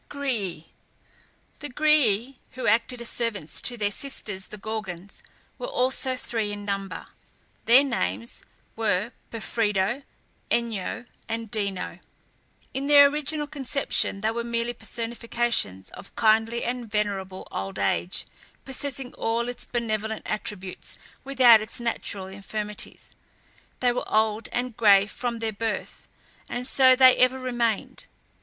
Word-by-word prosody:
GRÆÆ. 225 - -2 0.9
The 290 - -5
Grææ, 265 -4 +3 0.2
who 255 - -5
acted 235 +3 +2
as 235 - +1
servants 215 -9 -2
to 245 - +1
their 205 -2 0
sisters 205 -6 -3
the 215 - -9
Gorgons, 200 -3 -6 0.4
were - - -4
also 260 - +2
three 225 -4 -2
in 205 0 -6
number; 195 -1 -3 0.6
their 250 +4 +8
names 110 - -2 0.3
were 215 0 0 0.2
Pephredo, 220 +1 0 0.5
Enyo, 235 0 -1 0.2
and 225 -1 -3
Dino. 200 -4 -3 0.7
In 275 +1 -2
their 285 -1 +8
original 300 0 -2
conception 275 -7 +1
they 220 +1 +1
were 235 +1 -2
merely 235 0 -1
personifications 230 - -1
of - - -12
kindly 225 +1 +3
and 245 -1 -3
venerable 200 -3 -2
old 95 +1 -4
age, 100 - 0 0.4
possessing 270 -1 -3
all 230 +1 -1
its 245 - -2
benevolent 220 -2 -2
attributes 200 -3 -4 0.3
without 250 -5 +7
its 215 - -4
natural 230 -4 -2
infirmities. 205 +2 -5 0.7
They 250 -1 +4
were 245 - -4
old 215 0 +2
and 245 -1 -2
gray 200 -3 +6
from 235 +2 -3
their 225 -1 -2
birth, 220 +1 -4 0.4
and 245 +1 -3
so 260 0 +6
they 255 0 +8
ever 255 +1 +4
remained. 240 -4 -2
230 Hz, 125 wpm, -26 LUFS, 205-250 Hz, 0.9 s, their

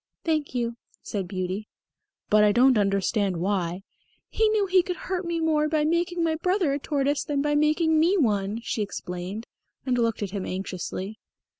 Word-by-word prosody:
"Thank 310 -5 -1
you," 235 -1 -1 0.3
said 195 -4 -3
Beauty. 185 +3 -3 0.6
"But 210 0 +6
I 210 - +5
don't 250 +4 +5
understand 195 -2 +1
why 180 0 -1 0.2
" - - -41
"He 440 -1 +2
knew 430 -2 +2
he 370 -1 +4
could 360 0 -4
hurt 365 +2 -4
me 340 -1 -1
more 305 -2 +2
by 305 -1 +1
making 340 +2 0
my 325 -1 +2
brother 360 -3 +1
a 285 - -1
tortoise 285 0 0
than 290 -2 -1
by 295 0 +1
making 310 +2 +3
me 350 +5 +4
one," 210 - +1
she 225 - -2
explained, 190 +1 -5 0.4
and 250 -2 +1
looked 230 -2 0
at 195 - -4
him 200 -2 -3
anxiously. 190 +2 -5
250 Hz, 180 wpm, -26 LUFS, 200-320 Hz, 0.6 s, But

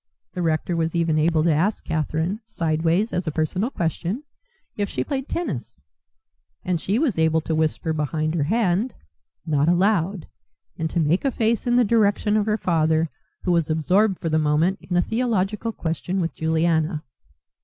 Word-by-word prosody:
The 180 - -3
rector 165 +1 0
was 165 0 -1
even 165 -2 +2
able 160 0 +2
to 165 -1 +3
ask 185 +8 0
Catherine, 160 +5 -1
sideways 165 +1 0
as 180 -1 -2
a - - +1
personal 165 - -1
question, 180 - -2 0.5
if 205 -1 -2
she - - -2
played 270 -1 -4
tennis; 135 - -4 0.8
and 180 -3 0
she 200 +4 0
was 250 - +1
able 160 0 +3
to 160 - -3
whisper 160 +1 0
behind 155 +1 -1
her 155 -4 0
hand, 215 - +1 0.5
"Not 150 -1 +2
allowed," 185 -1 +1 0.5
and 160 0 -2
to 170 - -1
make 165 +3 +2
a 275 - +2
face 230 -2 0
in 240 - +3
the 245 - +5
direction 210 -1 +2
of 215 0 +1
her 215 0 +2
father, 160 -3 +1 0.3
who 180 - +1
was 170 -3 +2
absorbed 180 +6 +2
for 165 - -2
the 155 0 +2
moment 155 +6 +2
in 180 - -2
a 175 - +4
theological 225 -2 -1
question 180 0 -3
with 170 -2 -1
Juliana. 160 0 0
170 Hz, 175 wpm, -23 LUFS, 160-205 Hz, 0.8 s, the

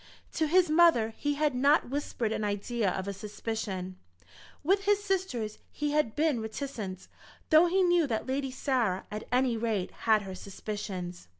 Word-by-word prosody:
To 315 - +1
his 360 +3 +4
mother 305 -9 +4
he 290 0 -1
had 300 -1 +1
not 265 0 +3
whispered 260 -5 -2
an 220 - -2
idea 205 +1 -1
of 190 +1 -3
a 200 - -2
suspicion. 200 -2 -5 0.7
With 390 +6 +2
his 410 0 +3
sisters 365 - -2
he 295 -1 -2
had 295 -7 +1
been 300 -6 +1
reticent, 220 -5 -5 0.4
though 315 +3 +7
he 375 +2 +3
knew 350 -3 +3
that 225 -4 -2
Lady 270 +1 -1
Sarah, 250 -8 0
at 210 +1 -6
any 250 -1 +2
rate, 220 -5 -1 0.2
had 215 -1 +5
her 190 -1 -7
suspicions. 185 - -6
240 Hz, 165 wpm, -29 LUFS, 210-300 Hz, 0.7 s, though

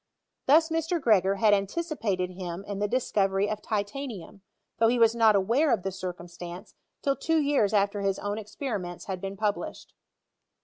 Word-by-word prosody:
Thus 320 +4 +5
Mr. 325 +1 0
Gregor 200 - +3
had 210 +1 +4
anticipated 200 - -1
him 180 0 -6
in 200 -1 -5
the 205 - +1
discovery 200 -4 +1
of 215 0 -3
titanium, 210 -2 -4 0.4
though 225 - +5
he 245 +2 +2
was 230 -1 +5
not 225 -2 +5
aware 235 +11 +2
of 180 - +1
the 195 - -2
circumstance 175 -1 -8 0.3
till 275 -2 +2
two 325 +3 0
years 280 -8 +2
after 205 -1 +1
his 195 -1 0
own 205 +1 -3
ex 210 -1 -12
periments 195 -10 -4
had 190 -2 -4
been 195 0 -5
published. 210 -1 -3
205 Hz, 170 wpm, -27 LUFS, 195-240 Hz, 0.4 s, Thus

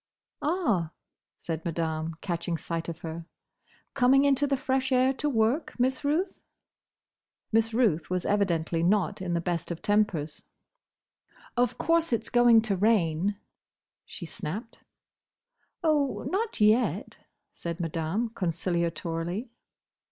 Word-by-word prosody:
"Ah," 255 - 0 0.4
said 160 -1 -4
Madame, 160 -1 -2
catching 170 -2 -2
sight 165 +2 -4
of 165 -1 -7
her. 165 0 -6 0.7
"Coming 270 +2 +4
into 280 0 +3
the 275 -1 +1
fresh 265 0 0
air 260 +1 +4
to 295 +2 -1
work, 245 +4 0
Miss 260 +3 +1
Ruth?" 310 +7 0 1.1
Miss 225 0 +2
Ruth 215 -10 +1
was 180 0 -1
evidently 170 -5 +1
not 185 0 +1
in 175 -2 -1
the - - +1
best 170 -2 -2
of 170 -1 -5
tempers. 195 -8 +1 1.1
"Of 245 -1 +1
course 335 -2 +2
it's 230 - -1
going 240 -2 +6
to 210 -3 0
rain," 195 -2 +2 0.7
she 175 - -9
snapped. 205 +7 -6 1.0
"Oh, 295 -4 +1
not 430 +4 -1
yet," 215 +4 +2 0.4
said 170 0 -5
Madame, 165 +7 -1
conciliatorily. 170 +1 -2
205 Hz, 120 wpm, -28 LUFS, 170-255 Hz, 1.1 s, going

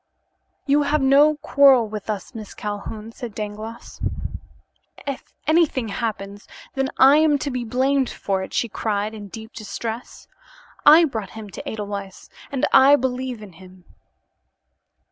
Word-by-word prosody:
"You 285 +1 +3
have 290 0 +1
no 285 +3 +5
quarrel 270 -6 +5
with 210 0 -7
us, 210 +3 -4
Miss 215 -3 -9
Calhoun," 210 +1 -6
said 235 -3 -8
Dangloss. 215 +2 -7 1.0
"If 275 -2 -6
anything 310 -7 +2
happens, 205 -2 -4 0.3
then, 270 0 -1
I 270 +3 +7
am 310 -2 +4
to 280 +1 -3
be 250 -1 -3
blamed 260 +3 +1
for 195 -1 -2
it," 190 - -6
she 235 - 0
cried 210 -1 -2
in 210 -2 -8
deep 220 +3 -10
distress. 225 +2 -6 0.6
"I 320 +3 +9
brought 220 - -4
him 210 -2 -8
to - - -7
Edelweiss, 200 -3 -6 0.2
and 270 -2 0
I 270 +2 +8
believe 255 -3 -3
in 195 -4 -12
him." 185 +1 -16
230 Hz, 145 wpm, -22 LUFS, 210-275 Hz, 1.0 s, I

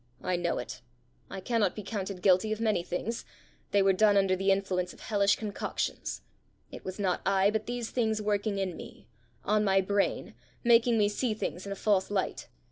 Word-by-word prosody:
"I 185 - 0
know 175 -1 -1
it: 125 +1 -6 0.5
I 195 - -6
cannot 230 +1 +1
be 210 - -6
counted 195 -2 -5
guilty 195 +2 +4
of 215 - -2
many 215 -5 +1
things; 185 +6 -4 0.5
they 200 -1 +3
were 195 0 +4
done 205 +1 +4
under 195 -1 +3
the 195 +1 0
influence 190 -2 0
of - - -17
hellish 200 -2 +2
concoctions. 210 -2 -4 0.5
It - - -9
was 185 0 -6
not 190 -3 0
I, 195 +1 +3
but 215 0 -2
these 240 -1 -4
things 220 -3 0
working 210 0 0
in 190 -3 -2
me 100 - -11 0.4
on 215 0 +2
my 195 -1 +3
brain, 200 +1 0 0.3
making 235 -1 +5
me 210 -1 +4
see 215 +2 -1
things 185 -2 -4
in - - -5
a - - -2
false 195 -2 +1
light! 200 -2 -2
200 Hz, 195 wpm, -29 LUFS, 190-215 Hz, 0.5 s, making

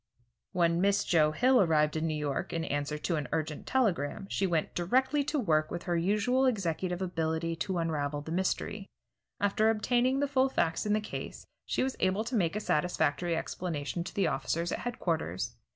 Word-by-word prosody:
When 170 -1 +2
Miss 200 +1 +3
Joe 155 -3 +3
Hill 250 +9 +4
arrived 155 -4 +3
in 160 +1 0
New 155 -1 -1
York, 145 -2 -2
in 165 -1 -1
answer 145 +1 -2
to 165 +2 -1
an 150 - -3
urgent 155 -1 -3
telegram, 195 - 0
she 195 - +1
went 165 -3 0
directly 260 +11 +2
to 300 - -1
work 155 - +2
with 175 +1 -5
her 175 - -1
usual 210 +9 +2
executive 185 -4 -1
ability 165 -2 -1
to 180 +3 -2
unravel 150 -3 -1
the 160 - -7
mystery. 190 +3 -1 0.5
After 205 +2 +2
obtaining 245 +4 +2
the 285 - +1
full 270 -1 +2
facts 170 -4 0
in 210 - +2
the 215 - +2
case, 210 - -7 0.2
she - - 0
was 265 0 -2
able 190 +3 +1
to 240 +2 -3
make 175 -4 +1
a - - 0
satisfactory 170 -2 0
explanation 170 -1 -3
to - - -7
the 195 - +2
officers 170 +1 -1
at - - -2
headquarters. 165 - -2
175 Hz, 185 wpm, -30 LUFS, 160-215 Hz, 0.5 s, Hill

